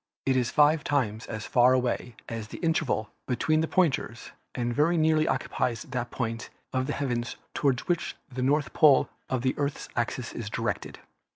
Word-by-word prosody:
It 135 - +2
is 125 -2 +2
five 150 +1 +4
times 115 -6 0
as 110 -2 -5
far 125 +1 +5
away 125 -2 -1
as 115 -2 -5
the - - -8
interval 160 -9 0 0.2
between 155 +5 +2
the 160 - 0
pointers 155 -10 0 0.2
and 120 -1 -1
very 160 +6 +3
nearly 155 -1 +3
occupies 115 -3 -1
that 125 -3 -4
point 115 -3 -3 0.2
of 130 0 0
the 145 - -1
heavens 120 -3 -2 0.2
toward 135 -4 +1
which 175 -2 -1
the 125 0 -5
north 145 +3 +1
pole 150 -4 +6 0.2
of 130 -2 -1
the 130 - +2
Earth's 140 0 -2
axis 120 0 -2
is 115 -2 -5
directed. - - -3
130 Hz, 175 wpm, -28 LUFS, 120-150 Hz, 0.2 s, pole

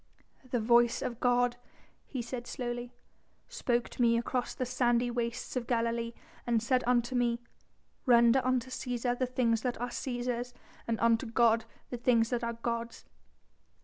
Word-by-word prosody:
"The 245 - 0
voice 235 +1 +4
of 235 -1 -4
God," 245 -1 +2 0.5
he 255 -4 -4
said 240 0 -6
slowly, 240 -1 -4 0.6
"spoke 245 - -1
to - - -5
me 235 -1 +4
across 245 +1 -2
the 255 - -2
sandy 245 -1 +1
wastes 240 +2 -3
of 245 -2 -2
Galilee 230 -1 0 0.3
and 230 -2 +2
said 255 +2 +2
unto 240 0 +2
me: 240 -1 +1 0.7
'Render 235 +1 +6
unto 255 0 0
Cæsar 245 -1 -2
the 255 - +1
things 235 -3 +1
that 245 -1 -2
are 245 +1 -2
Cæsar's, 245 -1 -3 0.3
and 230 -1 -1
unto 230 +2 +3
God 230 0 +3 0.3
the 245 - -3
things 235 -2 +2
that 245 -1 -1
are 235 0 -1
God's.'" 230 0 -4
240 Hz, 155 wpm, -31 LUFS, 235-250 Hz, 0.7 s, Render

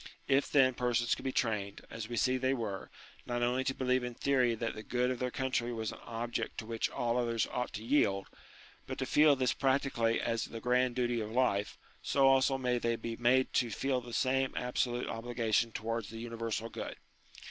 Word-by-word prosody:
If, 140 0 +3
then, 130 -3 +5
persons 120 -1 +1
could - - -5
be 130 - 0
trained, 105 -6 -1
as 115 -1 -6
we 120 - -3
see 130 +5 +2
they 130 +1 +1
were, 105 -6 -4 0.4
not 120 0 -1
only 125 +2 +1
to 130 - 0
believe 130 -1 +1
in 125 -1 -4
theory 125 -4 +2
that 115 0 -3
the 110 - -7
good 125 +3 0
of 125 - -3
their 125 - -1
country 125 -2 -1
was 110 -2 -3
an - - -10
object 115 -1 -3
to - - -5
which 115 0 -1
all 120 0 -1
others 115 -2 +1
ought 125 0 -2
to 110 - -5
yield, 100 -7 +2 0.6
but - - -5
to - - -1
feel 150 -1 +5
this 130 -2 +1
practically 130 -4 +1
as 115 0 -1
the 115 - -7
grand 125 +1 +2
duty 120 -2 0
of 105 0 -5
life, 115 -5 +1 0.2
so 135 -1 +2
also 135 0 +4
may 125 -2 0
they 115 0 0
be 115 0 -5
made 125 +3 +2
to 120 - +2
feel 130 +4 -1
the 120 0 -10
same 130 +2 +1
absolute 125 0 -1
obligation 115 -1 0
towards 115 0 -3
the 115 - -8
uni 115 0 -6
versal 115 0 -3
good. - - -5
120 Hz, 210 wpm, -32 LUFS, 115-130 Hz, 0.6 s, then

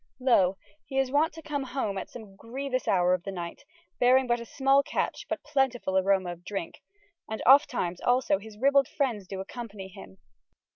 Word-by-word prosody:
Lo 195 -8 +3 0.3
he 270 - -6
is 265 -1 +1
wonte 300 +3 +3
to 320 0 -11
come 290 -2 -3
home 250 -6 -3
at 190 - -5
some 215 -5 -11
grievous 255 +4 -4
houre 180 -1 +3
of 185 - 0
ye - - -2
nyghte, 175 -2 -6 0.4
bearing 255 +2 +5
but 240 -1 +1
a 235 - -7
smalle 270 +2 +3
catche - - -3
but - - -3
plentyful 265 -9 0
aroma 190 -1 +2
of 175 0 -10
drinke, 195 -2 -6 0.5
and 220 - -4
ofttimes 245 - +4
alsoe 245 -5 +2
hys 215 0 -12
rybalde 275 +2 +4
freinds 235 -10 -2
do 190 0 -6
accompany 205 -2 -7
hym. 95 - -13
235 Hz, 185 wpm, -28 LUFS, 190-270 Hz, 0.5 s, bearing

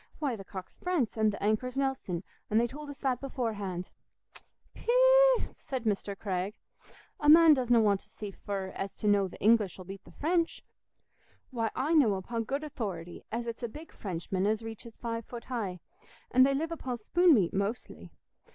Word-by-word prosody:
Why, 280 -6 -1
th' 195 -2 -10
cock's 190 -2 -8
France, 345 -11 -1
an' 220 -1 +3
th' 205 - -2
anchor's 220 +5 0
Nelson—an' 220 -7 -2
they 235 - +4
told 290 +4 -7
us 285 - -8
that 260 -3 -1
beforehand." 205 -9 -3 0.8
"Pee—ee - - +5
eh!" - - -4
said 260 -4 -5
Mr. 200 -2 -1
Craig. 195 +1 -2 0.6
"A 295 - +3
man 325 0 +9
doesna 245 -4 +3
want 205 -3 +3
to 205 - -16
see 210 -2 -7
fur 195 -1 -5
to 195 +2 -4
know 205 -1 +4
as 185 - -7
th' - - -10
English 215 -2 +3
'ull 185 - -10
beat 195 +1 -9
the - - -16
French. 335 - 0 0.9
Why, 230 -3 -1
I 290 +6 0
know 255 -11 +5
upo' 230 +5 -3
good 275 +6 -3
authority 190 - -5
as 235 +2 -2
it's 230 +1 -5
a 235 - -1
big 305 +8 -11
Frenchman 185 0 -2
as 220 +1 0
reaches 225 +1 -9
five 230 -1 -4
foot 235 +1 -8
high, 205 -8 -4 0.5
an' 255 - +5
they 275 +1 +5
live 320 +4 -2
upo' 265 -6 -3
spoon 340 +9 +4
meat 185 -7 +2
mostly. 200 +5 -3
230 Hz, 185 wpm, -30 LUFS, 200-275 Hz, 0.9 s, man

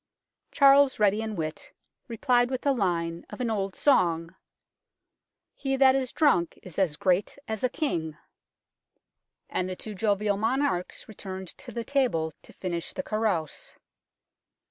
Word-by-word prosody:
Charles, 275 -1 +6
ready 210 +1 +3
in 220 -1 -4
wit, 155 -3 -5 0.4
replied 245 +1 +2
with 260 -1 -2
the 280 - +2
line 170 -7 -1
of - - -9
an 240 -2 -1
old 195 -3 -2
song 170 - +2 0.6
" - - -59 0.5
He 270 -1 -2
that 265 -1 +6
is 265 -2 -1
drunk 265 - +2
is 180 -2 -6
as 165 -6 +1
great 185 +5 +1
as 220 0 -4
a 255 - +3
King," 165 - -2 1.3
and 185 0 -2
the 185 - -4
two 215 +3 -7
jovial 205 0 +1
monarchs 220 -5 -1
returned 190 -3 -7
to - - -11
the 235 - -4
table 225 - 0
to - - -15
finish 175 -3 -4
the 280 - -4
carouse. 215 - -2
210 Hz, 145 wpm, -27 LUFS, 175-255 Hz, 1.3 s, Charles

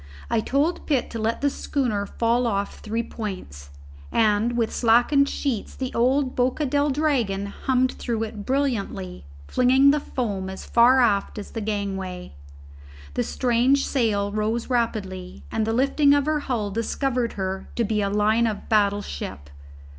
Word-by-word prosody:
I 230 - +3
told 285 +9 0
Pitt 275 -5 0
to 230 - -4
let 220 +1 -1
the 285 - +3
schooner 225 -10 -1
fall 235 +3 +1
off 200 -2 -2
three 225 +2 -2
points, 185 - -7 0.4
and 220 +2 +2
with 230 -2 0
slackened 245 +5 +4
sheets 255 -8 -3
the 260 -1 -4
old 260 +2 +1
Boca 255 +4 +1
del 285 +2 +1
Dragon 260 -9 0
hummed 255 +5 0
through 225 -2 -3
it 215 -2 -6
brilliantly, 205 - -2 0.2
flinging 265 +3 +5
the 300 - +1
foam 205 -9 -3
as 190 - -8
far 250 +2 +5
aft 205 -4 +1
as 205 - -7
the 225 - -4
gangway. 195 - -4 0.8
The - - 0
strange 255 +3 +2
sail 210 -6 0
rose 220 +4 -2
rapidly, 195 -6 -2
and 220 -1 -1
the - - +1
lifting 280 +3 +4
of 285 -1 +1
her 305 0 +1
hull 230 -8 -2
discovered 240 +3 -1
her 190 -1 -4
to 235 - +1
be 210 -1 0
a 200 - 0
line 215 +3 +2
of 215 -2 -4
battle 205 -1 +2
ship. 70 0 -7
230 Hz, 160 wpm, -24 LUFS, 205-260 Hz, 0.8 s, flinging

